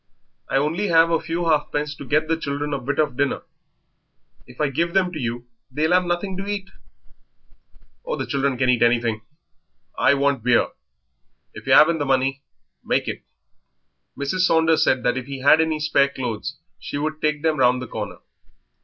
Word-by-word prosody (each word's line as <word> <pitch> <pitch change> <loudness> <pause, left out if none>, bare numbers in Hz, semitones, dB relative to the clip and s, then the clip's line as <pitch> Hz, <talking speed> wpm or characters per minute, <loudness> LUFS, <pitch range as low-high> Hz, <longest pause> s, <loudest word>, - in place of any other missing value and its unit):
"I - - +1
only 160 +9 0
have 165 -1 +4
a 165 - +2
few 170 +2 -3
halfpence 150 -1 0
to - - -9
get 155 +3 +1
the 165 - +1
children 145 -1 -3
a 140 - -1
bit 135 +3 -3
of 150 -5 +1
dinner; 140 +1 -1 1.0
if 125 - -16
I 150 -2 +1
give 170 +5 -1
them 185 -2 +2
to 160 - -6
you 120 -1 -4 0.2
they'll 155 +6 0
have 180 0 +3
nothing 175 +2 -2
to 195 +1 -5
eat." 200 -1 -4 1.3
"Oh, - - -3
the - - -4
children 140 -2 -1
can 130 0 +1
eat 125 -2 +2
anything; 115 -2 +2 0.7
I 140 - +3
want 140 -3 0
beer. 125 -1 +3 0.8
If - - -11
yer - - +6
'aven't 165 +1 +6
money, 135 0 0 0.4
make - - 0
it." - - -4 1.0
Mrs. 140 +6 -2
Saunders 160 -3 +3
said 130 -2 +1
that 125 +1 +1
if 130 0 -5
he 135 -1 -6
had 150 +4 +6
any 160 -1 0
spare 140 -2 +2
clothes 125 -6 -5 0.2
she - - -5
would 155 +1 -3
take 150 0 0
them 160 -1 +1
round 125 -1 +3
the 130 - -6
corner. - - -6
145 Hz, 180 wpm, -22 LUFS, 130-165 Hz, 1.3 s, yer